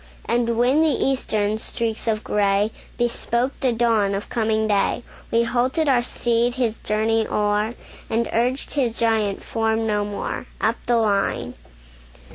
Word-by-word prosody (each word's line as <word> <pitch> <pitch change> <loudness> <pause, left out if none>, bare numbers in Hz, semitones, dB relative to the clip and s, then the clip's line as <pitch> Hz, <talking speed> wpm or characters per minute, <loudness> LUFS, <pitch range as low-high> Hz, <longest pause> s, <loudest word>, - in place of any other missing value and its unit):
And 235 -1 +1
when 255 +6 +4
the 320 - +4
Eastern 220 -7 0
streaks 225 0 -3
of 215 -1 0
gray 205 +1 +1 0.3
Bespoke 240 +1 0
the 260 - +2
dawn 225 -4 +2
of 200 - -5
coming 220 -1 +1
day, 205 +3 +1 0.3
We 230 0 +3
halted 255 +6 0
our 255 -3 +4
steed, 240 0 0
his 235 -4 -1
journey 220 +1 +1
o'er, 210 +2 0 0.3
And 230 +1 +1
urged 250 +4 0
his 245 -6 0
giant 220 -4 +1
form 225 0 0
no 210 -1 +1
more, 205 0 -4
Up 225 +2 +1
the 240 -1 +3
line. 200 - 0
225 Hz, 145 wpm, -22 LUFS, 215-240 Hz, 0.3 s, when